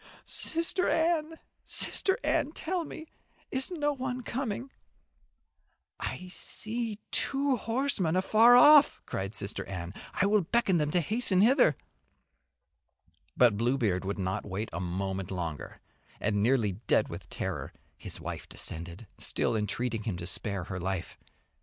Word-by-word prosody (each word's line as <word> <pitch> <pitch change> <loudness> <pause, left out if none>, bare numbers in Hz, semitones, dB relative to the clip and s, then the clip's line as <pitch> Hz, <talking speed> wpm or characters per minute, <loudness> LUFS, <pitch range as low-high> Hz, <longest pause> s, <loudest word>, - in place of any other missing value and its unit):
"Sister 335 +3 0
Anne, 325 -1 +1 0.3
Sister 385 - +1
Anne, 295 +2 +1
tell 345 +1 -2
me 315 - -8 0.5
is 260 0 +1
no 295 -5 0
one 255 -2 -4
coming?" 255 +1 -3 1.3
"I 185 - -4
see 220 +3 -5
two 275 0 +1
horsemen 230 - 0
afar 220 +6 +6
off," 295 +3 +7
cried 95 +3 -4
Sister 100 +1 -4
Anne. 90 -2 -6 0.2
"I - - +2
will 210 +1 +4
beckon 195 0 +2
to - - +1
them 150 -1 +1
to 175 +3 +2
hasten 210 - +1
hither." 240 - +5 1.6
But 120 -5 +5
Bluebeard 115 -6 +1
would 100 +1 -3
wait 95 - -2
not 95 +3 -3
a - - -3
moment 95 +1 -3
longer, 85 -6 -5 0.4
and 105 -1 0
nearly 115 -2 +3 0.2
dead - - +3
with - - -8
terror - - -4 0.2
his - - -7
wife - - -6
descended, 85 +6 -5
still - - +1
entreating 110 +2 -1
him 105 -5 -3
to 85 - -6
spare 100 +1 -3
her 95 +1 -5
life. 95 -1 -4
170 Hz, 140 wpm, -29 LUFS, -, 1.6 s, off